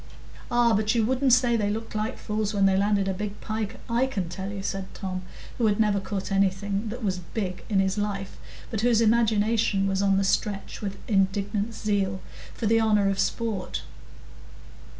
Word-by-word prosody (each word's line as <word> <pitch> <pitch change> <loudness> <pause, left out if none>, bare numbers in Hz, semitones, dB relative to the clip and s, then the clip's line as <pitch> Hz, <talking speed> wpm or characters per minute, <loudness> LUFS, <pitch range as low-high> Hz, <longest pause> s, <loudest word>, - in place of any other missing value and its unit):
"Ah, 240 -1 +4
but 215 +2 +2
you 225 -2 +3
wouldn't 260 +2 +2
say 245 -1 +5
they 210 -3 +1
looked 225 +2 -4
like 215 +1 -2
fools 210 -1 -2
when 200 -1 +4
they 190 -1 +4
landed 200 0 +2
a 190 - 0
big 205 +2 -5
pike, 215 0 -3
I 240 +2 +2
can 195 -10 -3
tell 190 +3 -5
you," 200 -1 -5
said 195 -1 -4
Tom, 185 -2 -4 0.4
who 230 - +3
had 205 0 +1
never 210 -2 +3
caught 195 0 -4
anything 195 +2 0
that 240 +2 -6
was 185 -3 0 0.2
"big" 185 -5 -3
in 200 -3 +2
his 190 +1 +1
life, 195 -2 -3 0.3
but 220 -3 -1
whose 235 -1 +4
imagination 220 -2 +3
was 195 0 0
on 195 -1 +3
the 195 - +2
stretch 200 +2 -1
with 200 -2 -4
indignant 200 +2 0
zeal 195 -3 0 0.4
for 230 - -3
the 225 +1 +4
honour 210 -3 +3
of 195 - -3
sport. 210 -1 -1
205 Hz, 190 wpm, -26 LUFS, 195-220 Hz, 0.4 s, say